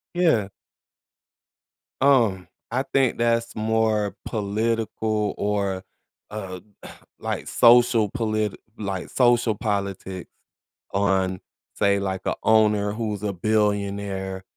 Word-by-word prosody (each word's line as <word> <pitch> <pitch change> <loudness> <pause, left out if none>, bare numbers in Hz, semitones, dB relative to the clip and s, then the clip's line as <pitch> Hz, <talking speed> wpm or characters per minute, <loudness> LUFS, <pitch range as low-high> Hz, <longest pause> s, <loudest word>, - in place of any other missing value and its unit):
Yeah. 160 - +3 1.5
Um, 115 -10 +3 0.2
I 130 +3 0
think 135 -3 +2
that's 115 0 0
more 110 -1 +1
political 110 0 -1
or, 100 -2 -1 0.5
uh, 95 -3 -6 0.6
like - - -4
social 120 -2 +5
politi 110 -4 -1 0.2
like, 100 -3 -4
social 120 -3 +3
politics 100 -3 -3 0.6
on, 95 -2 +1 0.4
say, 100 0 +2
like, 95 -1 -3
a - - 0
owner 105 -2 +3
who's 105 -3 -3
a 100 - -1
billionaire, 100 -1 -1
105 Hz, 95 wpm, -24 LUFS, 100-115 Hz, 1.5 s, social